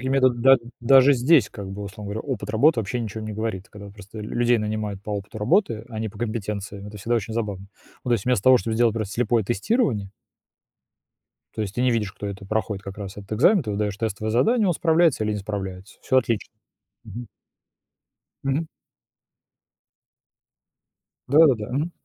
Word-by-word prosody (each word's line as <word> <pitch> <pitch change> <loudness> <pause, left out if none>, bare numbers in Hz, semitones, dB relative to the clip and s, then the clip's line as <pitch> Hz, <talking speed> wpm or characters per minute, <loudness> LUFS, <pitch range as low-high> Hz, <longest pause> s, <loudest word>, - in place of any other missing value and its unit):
к - - -10
нем 130 - 0
метод 130 -3 +3
да 135 +2 +7 0.2
даже 135 +3 +6
здесь, 135 +3 +4
как 100 -4 -8
бы, 100 +1 -6
условно 100 0 -7
говоря, 110 - -3
опыт - - -5
работы 130 +5 +4
вообще 115 +3 -2
ни 115 - -3
о - - -5
чём 110 +2 -7
не 110 - -5
говорит. 105 -3 -4
Когда 100 -1 -11
просто 105 +1 -12
лю 105 - -7
людей 120 0 +3
нанимают 105 -2 -3
по 105 - -7
опыту 100 +1 -5
работы, 110 - +1
а 110 -2 -6
не 110 - -2
по - - -13
компетенциям, 105 -3 -4
это 105 0 -9
всегда 120 +4 0
очень 110 +1 -4
забавно. 100 -4 -3 0.4
Ну, - - -4
то - - +4
есть, 110 -5 0
вместо 125 -6 +1
того, 130 -1 +7
чтоб 115 -2 -3
сделать 115 -1 +3
просто 105 -3 -3
слепое 120 -1 +1
тестирование 115 - 0 1.5
то - - -2
есть 105 -2 -4
ты 125 - 0
не 125 -1 +3
видишь, 105 -4 -1
кто 105 - -6
это 100 0 -7
проходит 105 -1 -2
как 100 0 -8
раз 100 -1 -7
этот 100 +1 -7
экзамен. 160 - +4
Ты 105 - -4
выдаёшь 100 -1 -2
тестовое 110 0 -2
задание, 215 - +3
он 175 - +2
справляется 160 -7 +3
или 105 - 0
не 105 - -2
справляется. 95 -1 -6
Всё 130 - +2
отлично. 115 -3 -1 0.5
Мгм. 115 +3 -8 1.2
Мгм. 140 +4 0 2.6
Да-да-да, 135 -7 +4
мгм. 155 +5 -1
110 Hz, 195 wpm, -24 LUFS, 100-125 Hz, 2.6 s, да